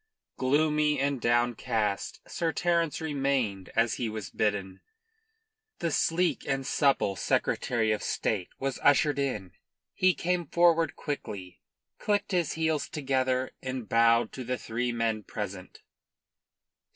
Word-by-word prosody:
Gloomy 150 +2 +2
and 140 -2 0
downcast, 120 -3 0
Sir 165 -1 -1
Terence 170 -2 0
remained 135 - -1
as 115 0 +3
he 120 -3 -2
was 105 -3 -6
bidden. 100 -3 -1 1.0
The 170 -1 -1
sleek 170 +4 +1
and 135 -1 -1
supple 135 -10 +2
Secretary 110 +4 0
of 105 - 0
State 95 -5 -1
was 135 -1 -3
ushered 145 0 +4
in. 105 -10 -2 0.4
He 185 -1 +3
came 175 -2 -1
forward 170 0 +3
quickly, 105 - -6 0.4
clicked 205 -1 0
his 175 -4 +1
heels 160 -2 0
together 130 -3 0
and 130 -3 -4
bowed 115 0 +4
to 130 - -6
the 125 +1 -2
three 120 +2 -2
men 115 -2 -1
present. 100 -3 -7
130 Hz, 125 wpm, -28 LUFS, 110-150 Hz, 1.0 s, ushered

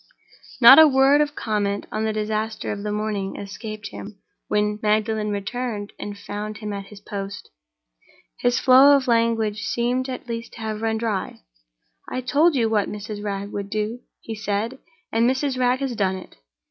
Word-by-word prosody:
Not 260 +4 +10
a 315 - +10
word 275 +1 +5
of 295 0 -1
comment 205 -2 -1
on 215 +1 -1
the 220 - 0
disaster 215 +1 -2
of 200 - -4
the 210 0 -3
morning 210 -2 -2
escaped 215 +1 -7
him 205 0 -9 0.3
when 210 0 0
Magdalen 215 0 +1
returned 205 +1 -4
and 205 0 -6
found 210 +1 -6
him 210 -1 -5
at 200 -1 -6
his 205 0 -12
post. 200 - -7 0.9
His 245 0 +2
flow 270 +2 +7
of 275 -2 0
language 230 -3 +1
seemed 245 +4 -1
at 255 - -6
last 230 0 -5
to 230 - -10
have 215 -1 -4
run 225 0 0
dry. 220 -4 -3 0.7
"I 255 - -3
told 295 +6 +3
you 235 -4 +2
what 215 -2 +1
Mrs. 210 0 -6
Wragge 200 0 -4
would 200 -1 -5
do," 215 +3 -2 0.2
he 225 - -6
said, 215 +4 -3 0.3
"and 230 +2 +3
Mrs. 265 0 -1
Wragge 250 +1 +2
has 265 -3 -2
done 190 -3 0
it." 185 - -11
215 Hz, 175 wpm, -23 LUFS, 205-245 Hz, 0.9 s, Not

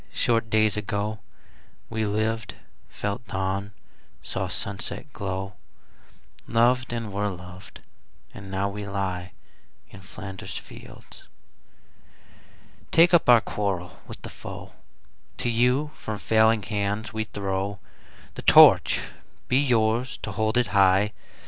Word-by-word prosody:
Short 115 -1 +1
days 110 -1 +3
ago 105 +1 -2 0.7
We 110 -1 -2
lived, 110 +2 -1 0.3
felt 105 +3 -4
dawn, 95 +1 -2 0.5
saw - - -3
sunset - - -5
glow, 95 0 -4 0.9
Loved, 120 +2 +2
and 115 -4 -4
were 105 +1 0
loved, 90 0 -10 0.5
and 100 -1 -10
now 95 +1 -1
we 100 +1 -6
lie 95 -3 -3 0.6
In 95 - -12
Flanders 95 +1 -7
fields. - - -12 1.6
Take 170 +2 +5
up 170 -6 +5
our 120 -2 +8
quarrel 95 -5 -3
with - - -8
the - - -6
foe: - - -9 0.6
To 120 - -1
you 125 +6 +2
from 110 -1 -5
failing 110 0 +3
hands 105 +2 -2
we 110 0 -2
throw 100 -1 -3 0.6
The - - -7
Torch: - - +7 0.5
be 130 - +3
yours 120 -1 +1
to - - -3
hold 110 +1 0
it 125 - +4
high! 100 +1 +4
105 Hz, 120 wpm, -25 LUFS, 100-115 Hz, 1.6 s, our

